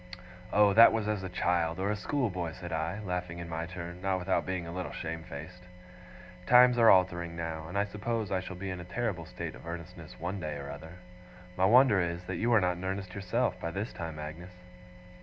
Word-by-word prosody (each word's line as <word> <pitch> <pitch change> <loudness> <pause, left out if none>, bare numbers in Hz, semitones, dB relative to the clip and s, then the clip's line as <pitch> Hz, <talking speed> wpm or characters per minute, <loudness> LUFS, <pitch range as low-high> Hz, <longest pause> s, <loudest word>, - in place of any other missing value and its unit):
'Oh! 105 -1 +5
that 115 +2 +9
was 110 -1 -1
as 105 -2 -1
a 95 - -5
child, 85 -2 0
or 100 +2 0
a - - 0
schoolboy,' 100 - -2
said 85 -1 -8
I, 80 +6 -2
laughing 90 -3 -3
in 85 -1 -6
my 80 0 -4
turn, 85 0 -7
not 95 0 +1
without 95 +1 0
being 95 -2 -2
a 85 - -6
little 90 +1 -4
shame 80 0 -5
faced. 80 +5 -9 0.9
'Times 125 0 +7
are 115 - +7
altering 85 -2 +3
now, 80 -1 -4
and 85 - -4
I 100 - +3
suppose 105 +1 -3
I 95 - +1
shall 95 0 -7
be 95 +1 -5
in 90 - -5
a - - -6
terrible 90 -2 -3
state - - -6
of - - -12
earnestness 85 +1 -8
one 90 +4 -3
day 75 -4 -4
or 70 0 -6
other. 80 +3 -9 0.6
My 95 - +3
wonder 115 -2 +6
is, 85 0 -2
that - - -4
you 120 +2 +1
are 115 - +6
not 90 -2 +1
in 90 - -8
earnest 95 0 -3
yourself, 100 -3 -1
by 85 - -3
this 100 +7 -4
time, 80 -2 -6
Agnes. 80 +4 -8
90 Hz, 220 wpm, -30 LUFS, 85-100 Hz, 0.9 s, that